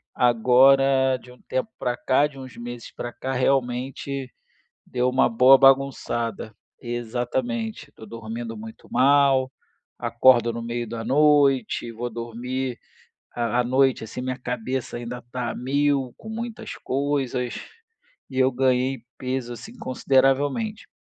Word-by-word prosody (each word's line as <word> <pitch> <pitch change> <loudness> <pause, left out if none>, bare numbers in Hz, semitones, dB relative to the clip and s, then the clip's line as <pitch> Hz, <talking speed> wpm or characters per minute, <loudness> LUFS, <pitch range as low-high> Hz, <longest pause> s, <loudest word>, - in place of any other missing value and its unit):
Agora, 130 +2 +4
de 125 - -15
um 125 - -21
tempo 130 +11 -2
pra 120 -1 -2
cá, 130 +3 +3
de 140 -2 -13
uns 130 -1 -10
meses 120 0 -8
pra 120 - -5
cá, 130 +2 -5
realmente 130 +1 -1 0.6
deu 125 0 0
uma 130 - +3
boa 125 +3 +6
bagunçada. 130 -5 +2 0.3
Exatamente. 120 -1 -3
Tô 110 - -13
dormindo 115 +1 -6
muito 110 +1 -11
mal, 135 -1 +4 0.5
acordo 120 -1 +4
no 115 - -5
meio 120 0 -3
da 115 -1 -5
noite, 140 -3 +3
vou 120 +2 -4
dormir 120 +2 -4 0.6
à 120 0 0
à - - 0
noite, 130 -1 +2
assim, 110 +3 -7
minha 130 0 -3
cabeça 125 +1 -4
ainda 120 +1 -6
tá 125 -2 -2
a - - -5
1000, 140 0 0
com 220 - -11
muitas 225 0 -6
coisas, 135 -3 -2 0.8
e 130 - -4
eu 130 0 +4
ganhei 130 +1 +1 0.2
peso, 130 -1 -3
assim, 220 - -11
consideravelmente. 140 - +1
125 Hz, 135 wpm, -24 LUFS, 120-135 Hz, 0.8 s, boa